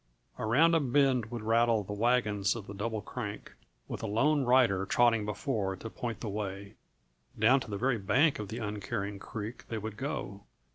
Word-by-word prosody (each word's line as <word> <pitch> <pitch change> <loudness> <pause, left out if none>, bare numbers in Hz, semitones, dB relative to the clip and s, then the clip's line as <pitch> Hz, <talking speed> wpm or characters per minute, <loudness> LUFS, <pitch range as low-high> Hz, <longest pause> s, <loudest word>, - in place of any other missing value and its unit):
Around 150 +10 +4
a 165 - +5
bend 135 -4 +2
would 120 -2 -5
rattle 115 -1 +3
the 100 - -6
wagons 105 -3 +1
of 110 -4 -6
the 100 - -8
Double 105 +1 -3
Crank, - - -6 0.3
with - - -5
a - - -3
lone 140 +8 +2
rider 120 -7 +4
trotting 115 -2 +3
before 105 -4 -2
to 110 +4 -8
point 115 -3 -5
the 115 - -4
way; 100 -1 -5 0.6
down 120 +6 +5
to 120 - -8
the 100 - -3
very 125 +1 +1
bank 135 +9 +3
of 105 - -4
the 110 - -6
uncaring 105 -2 -4
creek 110 +3 -7
they 115 - -3
would 110 0 -6
go. 105 -8 -4
110 Hz, 185 wpm, -30 LUFS, 105-125 Hz, 0.6 s, a